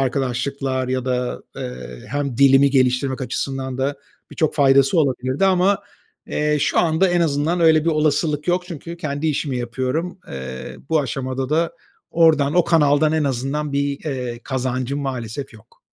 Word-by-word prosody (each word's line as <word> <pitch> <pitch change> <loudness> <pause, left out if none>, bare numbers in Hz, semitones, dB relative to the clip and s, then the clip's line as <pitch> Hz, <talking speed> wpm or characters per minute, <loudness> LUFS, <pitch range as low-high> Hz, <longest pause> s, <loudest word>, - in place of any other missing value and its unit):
arkadaşlıklar 130 0 -1
ya 130 -1 -1
da, 125 -1 -2
eee, 60 -1 -7
hem 140 -2 -2
dilimi 140 0 +6
geliştirmek 130 0 +1
açısından 130 0 -3
da 140 +2 -1 0.3
birçok 155 - 0
faydası 140 +2 +4
olabilirdi. 130 +2 +1
Ama, 190 +1 +3 0.5
eee, 150 0 0
şu 150 +2 +1
anda 170 +3 +3
en 175 0 +2
azından 160 +2 +1
öyle 160 -1 +5
bir 170 - +3
olasılık 150 0 +1
yok 180 +1 +2
çünkü 170 0 -7
kendi 150 -2 -3
işimi 145 -3 -1
yapıyorum. 130 +10 -3
Eee, 65 -1 -7
bu 160 -1 +3
aşamada 130 0 -3
da 165 +2 +1 0.4
oradan, 155 -4 +3
o 175 -1 +4
kanaldan 155 -2 +3
en 155 -2 +1
azından 140 +3 -2
bir, 140 0 -1
eee, 125 -5 -4
kazancım 130 +1 -2
maalesef 130 -1 -5
yok. 110 - -19
140 Hz, 150 wpm, -21 LUFS, 130-155 Hz, 0.5 s, dilimi